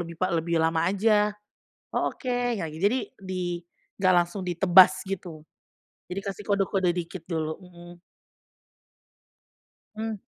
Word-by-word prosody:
lebih 170 -1 -6
pa 185 +1 -1
lebih 170 0 0
lama 160 +1 +2
aja" 210 +1 +2 0.5
"Oh - - -1
oke" 255 - -5
ya 245 -9 -1
gi 155 - -9
jadi, 205 +8 +2 0.2
di 185 -2 -3 0.4
nggak 185 -1 +4
langsung 180 +2 -7
ditebas 185 +1 +6
gitu. 175 -5 -6 0.7
Jadi 180 +2 -4
kasih 195 +1 -5
kode-kode 195 -2 +1
dikit 175 0 -5
dulu 160 0 -3
hmm. 175 -1 -14 2.0
Hmm. 220 0 -3
185 Hz, 130 wpm, -26 LUFS, 170-200 Hz, 2.0 s, ditebas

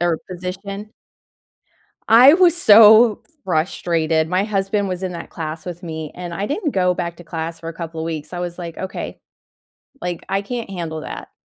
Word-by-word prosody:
or 170 -2 +1
position. 195 +3 -6 1.2
I 245 +6 +8
was 350 -1 +5
so 220 - +7 0.2
frustrated. 160 -2 0
My 185 +3 +1
husband 200 -1 -1
was 185 0 -4
in 185 -1 -3
that 170 - -8
class 160 -1 -6
with 175 0 -7
me, 160 -3 -6
and 175 -1 -6
I 195 +4 -2
didn't 300 - -2
go 180 -1 +2
back 170 -1 -4
to 175 - -13
class 165 0 -5
for 165 - -7
a - - -5
couple 165 -1 -7
of - - -3
weeks. 160 -1 -5
I 175 - -5
was 175 0 -5
like, 170 -2 -7
"Okay," 190 - -6 0.8
like, 175 -1 -4
"I 195 +1 0
can't 235 0 -5
handle 165 -4 -5
that." - - -8
180 Hz, 185 wpm, -20 LUFS, 165-200 Hz, 1.2 s, I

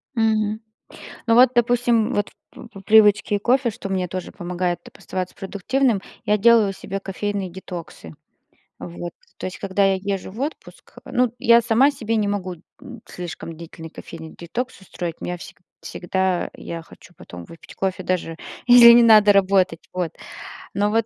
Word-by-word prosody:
Мгм, 220 -1 +1 0.7
ну 230 - +4
вот, 250 +1 +7
допустим, 240 0 +2
вот, 205 0 0 0.2
по - - -12
по 200 -4 -12
привычке 210 0 +4
кофе, 245 +3 +2
что 210 -2 -8
мне 185 -2 -1
тоже 185 +1 -6
помогает 175 0 -3 0.2
оставаться 185 -1 -5
продуктивным, 210 +4 -1 0.2
я 210 0 +2
делаю 220 -2 +5
себе 195 +1 -6
кофейные 195 -1 -4
детоксы. 170 - -9 0.7
Вот, 175 0 -7 0.3
то - - -6
есть, 185 - -5
когда 195 0 +1
я 195 - +3
езжу 195 -1 -4
в 220 - -11
отпуск, 295 +3 -7
ну, 245 -1 0
я 235 0 +5
сама 235 +5 +3
себе 230 -5 -3
не 210 -2 +1
могу, 190 -3 -3 0.3
м, 240 -3 -11
слишком 170 -2 -8
длительный 165 0 -10
кофейный 160 0 -11
детокс 235 +7 -5
устроить, 175 -3 -6
у - - -6
меня 180 0 -4
вс - - -11 0.3
всегда, 190 0 -2
я 165 -1 -7
хочу 175 - -17
потом 90 0 -11
выпить 165 - -14
кофе 190 -1 -2
даже, 170 -3 -2 0.3
если 245 -1 +10
не 240 0 +7
надо 215 -3 +7
работать, 190 -4 +2
вот. 180 -3 -2 0.6
Но, 205 +1 +1
вот 225 0 +1
200 Hz, 160 wpm, -22 LUFS, 180-230 Hz, 0.7 s, если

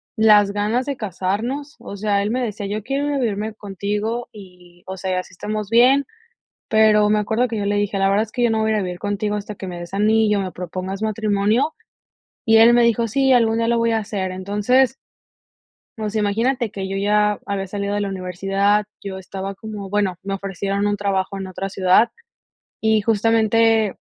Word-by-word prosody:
las 210 -3 +5
ganas 215 +5 0
de 280 -1 -3
casarnos, 225 - -3
o 200 - -8
sea, 200 0 +1
él 210 - -1
me 255 +2 -1
decía: 210 -4 -4
"yo 205 +2 -3
quiero 275 +6 -2
ir 290 - -1
a - - 0
vivirme 215 -3 -2
contigo" 210 +4 -3
y, 180 -3 -15
o 190 - -6
sea, 185 0 -2
así 185 - -9
estamos 210 +2 -4
bien, 255 +5 +5 0.6
pero 215 -1 +4
me 210 0 +3
acuerdo 220 +4 0
que 230 - -4
yo 205 - -2
le 205 0 0
dije: 205 -1 -1
"la 195 0 +3
verdad 205 +2 +2
es 215 - -16
que 250 - -2
yo 240 - +3
no 220 0 +1
voy 220 0 +1
a 215 - +1
vivir 180 -1 -5
contigo 205 +1 -2
hasta 210 +1 -6
que 195 - -8
me 180 -1 -6
des 175 +2 -8
anillo, 210 0 +3
me 185 -2 -4
propongas 185 +2 -5
matrimonio", 215 +5 +1 0.7
y 225 0 +5
él 230 +1 +7
me 240 0 +5
dijo: 235 0 +2
"sí, 270 +4 +2
algún 230 -2 +3
día 230 - +1
lo 235 0 +2
voy 230 0 +2
a 225 - +2
hacer". 200 -3 -3
Entonces 210 +7 +1 1.0
o 215 -1 -2
sea, 215 +1 -1
imagínate 230 +4 0
que 195 -1 -5
yo 195 - -3
ya 210 +1 +2
había 200 -1 -3
salido 200 +1 -3
de 205 - -1
la 200 - -1
universidad, 195 +2 0 0.2
yo 195 -1 -6
estaba 190 +1 -6
como, 205 -1 -8
bueno, 200 -3 0
me 195 +1 -4
ofrecieron 195 +1 -2
un 205 0 0
trabajo 195 -1 -1
en 195 -1 -5
otra 190 +1 -5
ciudad, 190 +4 +3 0.7
y 220 -1 +3
justamente 225 0 +2
210 Hz, 205 wpm, -21 LUFS, 195-225 Hz, 1.0 s, él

